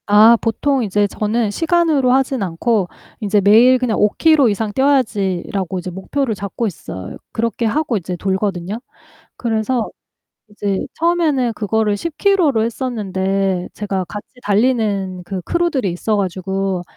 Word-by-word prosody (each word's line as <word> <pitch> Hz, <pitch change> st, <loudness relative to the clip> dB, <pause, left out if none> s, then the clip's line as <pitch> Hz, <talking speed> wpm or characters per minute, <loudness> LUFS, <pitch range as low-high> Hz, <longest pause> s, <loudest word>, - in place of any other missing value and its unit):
아 215 Hz, +3 st, +7 dB
보통 260 Hz, +4 st, 0 dB
인제 205 Hz, 0 st, +1 dB
저는 215 Hz, +1 st, -1 dB
시간으로 320 Hz, -3 st, +2 dB
하지는 265 Hz, -4 st, +1 dB
않고 190 Hz, +3 st, 0 dB, 0.3 s
인제 210 Hz, -1 st, +1 dB
'매일 230 Hz, +6 st, +6 dB
그냥 245 Hz, -3 st, -1 dB
5 210 Hz, -, +4 dB
키로 310 Hz, -6 st, +5 dB
이상 210 Hz, +1 st, -2 dB
뛰어야지.'라고 200 Hz, -9 st, 0 dB
이제 180 Hz, -, -6 dB
목표를 220 Hz, +6 st, -2 dB
잡고 200 Hz, +4 st, -3 dB
있어요. 95 Hz, -, -7 dB
그렇게 230 Hz, +1 st, -1 dB
하고 260 Hz, +1 st, 0 dB
이제 180 Hz, -1 st, -4 dB
돌거든요. 190 Hz, +1 st, -2 dB, 0.6 s
그래서 230 Hz, 0 st, -1 dB, 0.6 s
이제 200 Hz, -2 st, -2 dB
처음에는 315 Hz, -8 st, +1 dB
그거를 210 Hz, 0 st, 0 dB
10 325 Hz, +7 st, -5 dB
키로로 345 Hz, -, +3 dB
했었는데 195 Hz, -6 st, -1 dB
제가 195 Hz, -3 st, -2 dB
같이 205 Hz, +4 st, -8 dB, 0.2 s
달리는 205 Hz, -4 st, 0 dB
그 190 Hz, +1 st, -4 dB
크루들이 285 Hz, -, 0 dB
있어 210 Hz, +5 st, -1 dB
가지고 190 Hz, -1 st, -2 dB
215 Hz, 315 characters per minute, -18 LUFS, 195-255 Hz, 0.6 s, 아